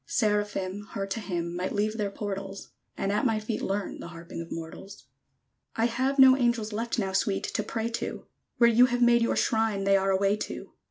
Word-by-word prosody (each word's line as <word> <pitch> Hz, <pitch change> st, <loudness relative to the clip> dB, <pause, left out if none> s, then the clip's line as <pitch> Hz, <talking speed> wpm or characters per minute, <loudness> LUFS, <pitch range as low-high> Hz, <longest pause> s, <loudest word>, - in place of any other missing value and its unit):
Seraphim, 205 Hz, -, -1 dB
Her 195 Hz, -, -2 dB
to 195 Hz, +3 st, -4 dB
hymn, 175 Hz, -4 st, -3 dB
Might 180 Hz, +1 st, -2 dB
leave 215 Hz, +1 st, 0 dB
their 210 Hz, -2 st, -1 dB
portals; 195 Hz, -1 st, -6 dB, 0.3 s
And 195 Hz, -, -1 dB
at 210 Hz, -, +1 dB
my 225 Hz, -3 st, +2 dB
feet 215 Hz, +1 st, -3 dB
learn 195 Hz, 0 st, -3 dB
The -, -, -7 dB
harping 170 Hz, 0 st, -8 dB
of 165 Hz, -, -10 dB
mortals! 165 Hz, 0 st, -8 dB, 0.7 s
I 225 Hz, -, +2 dB
have 260 Hz, +4 st, 0 dB
no 265 Hz, -1 st, +8 dB
angels 235 Hz, -4 st, 0 dB
left 230 Hz, +2 st, -2 dB
Now, 195 Hz, -4 st, -1 dB
Sweet, 195 Hz, +1 st, 0 dB
to -, -, -2 dB
pray 225 Hz, 0 st, -3 dB
to: 230 Hz, -, -4 dB, 0.3 s
Where 235 Hz, -, +6 dB
you 235 Hz, +2 st, +6 dB
have 245 Hz, 0 st, +1 dB
made 235 Hz, 0 st, +5 dB
your 230 Hz, -, +1 dB
shrine 220 Hz, -3 st, +1 dB
They 195 Hz, 0 st, +4 dB
are 195 Hz, 0 st, 0 dB
away 195 Hz, +2 st, +2 dB
to. -, -, -6 dB
210 Hz, 205 wpm, -28 LUFS, 195-230 Hz, 0.7 s, no